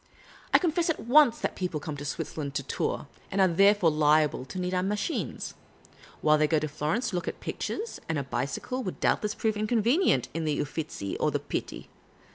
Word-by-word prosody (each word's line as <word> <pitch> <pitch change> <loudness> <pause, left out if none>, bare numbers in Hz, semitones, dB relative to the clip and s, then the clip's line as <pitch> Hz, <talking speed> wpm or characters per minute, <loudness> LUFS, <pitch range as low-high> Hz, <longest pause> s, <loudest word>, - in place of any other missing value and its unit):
I - - +8
confess 340 -1 +1
at 320 - 0
once 245 0 +5
that - - -2
people 180 -4 -2
come 150 0 -5
to 145 - -6
Switzerland 145 0 -4
to - - -1
tour, - - -2 0.2
and 195 - -2
are 190 - +6
therefore 195 0 +4
liable 150 -2 +3
to 160 - -8
need 180 0 -2
our 180 - +2
machines; 205 - -2 0.7
while 155 0 +4
they 155 - +4
go 160 - +2
to 155 0 -1
Florence 155 - -1
to - - -3
look 175 - -2
at - - -4
pictures, 455 +2 -4
and 160 - 0
a 140 - -1
bicj'cle 135 - -3
would 185 - -5
doubtless 210 0 +1
prove 220 -1 0
• - - -4
inconvenient 225 - +2
in 165 +1 -2
the 150 -2 0
Uffizi 145 -9 -4
or - - +2
the - - 0
Pitti. - - -5
175 Hz, 205 wpm, -28 LUFS, 150-215 Hz, 0.7 s, I